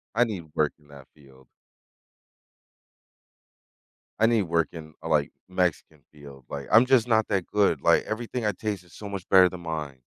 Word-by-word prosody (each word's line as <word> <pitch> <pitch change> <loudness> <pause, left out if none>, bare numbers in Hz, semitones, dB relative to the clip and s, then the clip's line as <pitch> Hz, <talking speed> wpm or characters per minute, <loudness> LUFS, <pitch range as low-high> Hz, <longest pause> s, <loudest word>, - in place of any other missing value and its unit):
I 120 - +5
need 100 -8 -4
work 75 -2 +2
in 75 - -25
that 70 -2 -14
field. 65 -3 -20 2.7
I 110 - +5
need 115 -2 +3
to - - +1
work 85 -1 0
in, 80 -2 -10
uh, 80 - -5
like, 75 -3 +1 0.2
Mexican 90 -4 -2
field. 70 -4 -14
Like, 70 -1 -6
I'm 115 +4 +7
just 125 -3 +3
not 110 -2 +2
that 95 -4 -1
good. 100 -8 +1
Like, - - +4
everything 115 +1 -4
I 105 - +2
taste 105 -2 -4
is 85 - -21
so 100 -1 -8
much 95 -2 -6
better 95 -1 +7
than 90 -1 -9
mine. 75 -5 -5
85 Hz, 185 wpm, -26 LUFS, 75-105 Hz, 2.7 s, I'm